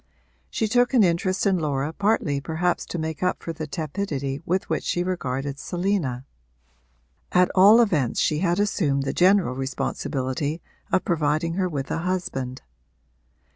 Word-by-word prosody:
She 220 - -1
took 245 +4 +2
an 230 - +6
interest 185 +2 +1
in 190 -3 +3
Laura 145 -1 -1
partly 185 -8 0
perhaps 170 +4 -1
to - - -4
make 160 -1 -4
up 180 0 -1
for 165 - -4
the 155 -1 -6
tepidity 145 -3 -3
with 185 +2 0
which - - -1
she 175 - 0
regarded 140 -6 -3
Selina. 175 -10 -2 1.1
At 180 0 +4
all 200 +5 +7
events 160 - +2
she 150 - +1
had 175 +1 +1
assumed 150 -9 +1
the 135 - -2
general 185 -6 +4
responsibility 135 +2 -3 0.3
of - - +2
providing 155 0 0
her 185 0 0
with 140 -4 -4
a - - -1
husband. 160 -8 -3
165 Hz, 150 wpm, -24 LUFS, 140-185 Hz, 1.1 s, all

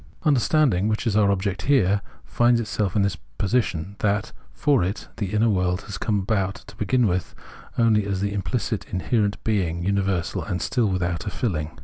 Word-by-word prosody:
Understanding, 130 - +3
which 110 +2 -1
is 110 -4 +1
our 105 -2 +4
object 100 0 -1
here, 100 -8 +3 0.2
finds 120 0 +3
itself 105 -3 -2
in 100 - +3
this 100 - 0 0.2
position, 100 -3 -1
that, 105 0 0 0.2
for 140 -9 +2
it, 95 +5 -3
the 100 - -2
inner 110 +2 +3
world 90 -3 +1
has 100 -1 -7
come 105 -3 0
about, 95 -1 0
to 100 - -13
begin 125 +2 +2
with, 90 -4 -1 0.4
only 110 -3 +3
as 100 -2 -1
the 100 +1 -1
imphcit 110 +2 -2
inherent 100 +2 0
being, 90 -6 0
universal 95 -3 0
and 90 -3 -3
still 120 -4 +1
without 90 0 -1
a - - +1
filling. 80 -8 -3
100 Hz, 175 wpm, -24 LUFS, 95-110 Hz, 0.4 s, our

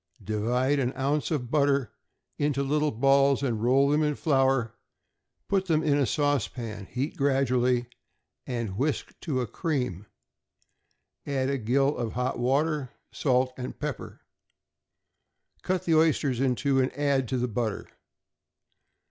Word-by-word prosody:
Divide 120 +7 0
an 130 0 0
ounce 140 +2 0
of 130 -6 -2
butter 140 -5 +2 0.5
into 145 -1 +1
little 150 +2 +1
balls, 135 +2 +3
and 115 -5 -1
roll 135 +4 +4
them 150 +1 +3
in 150 -1 +1
flour; 135 -6 +1 0.7
put 195 -1 0
them 160 -2 +2
in 150 -2 +2
a 140 -3 +2
saucepan, 115 - -2
heat 135 +5 -3
gradually, 125 -3 +2 0.6
and 115 -6 -3
whisk 145 +1 -1
to 140 -7 -1
a - - -1
cream; 125 - -3 1.2
add 135 -1 0
a 140 - -1
gill 135 +5 +1
of 115 -2 -3
hot 125 0 -2
water, 140 +2 +1 0.2
salt 130 -2 +1
and 125 0 -6
pepper. 150 -4 -5 1.4
Cut 185 0 -1
the 165 - +2
oysters 155 -5 +2
in 130 -2 +2
two, 135 +1 +1
and 130 - 0
add 140 -3 +1
to 130 - -1
the 125 0 0
butter. 110 -2 -3
135 Hz, 140 wpm, -27 LUFS, 125-145 Hz, 1.4 s, roll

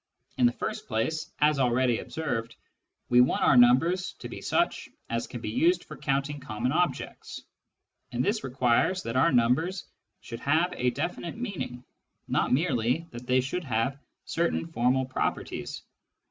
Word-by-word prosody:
In 125 - +6
the - - +2
second - - -4
place, 135 +9 -1
as 150 -1 +4
already 125 -1 +2
observed, 120 -8 -4 0.5
we 125 0 +6
want 125 - +2
our 135 - +5
numbers 165 +10 +4
to - - -9
be - - -8
such 345 0 0 0.2
as - - -1
can - - -7
be - - -4
used 335 +8 +2
for - - -10
counting 140 +1 -1
common 125 -1 -2
objects, 175 +3 -2 0.7
and 125 +1 -1
this 215 +2 0
requires 130 +8 +1
that 115 +1 -4
our 165 +6 +4
numbers 135 +10 +2 0.3
should 115 -1 -8
have, 160 +7 +2
a 125 - +1
definite 160 - -4
meaning, 190 - -5 0.4
not - - +1
merely 130 0 +1
that 120 +1 -9
they 130 0 +4
should 155 +8 -3
have 125 +3 -1 0.3
certain 170 0 0
formal 130 -4 +1
properties. 130 - -3
130 Hz, 155 wpm, -28 LUFS, 125-165 Hz, 0.7 s, In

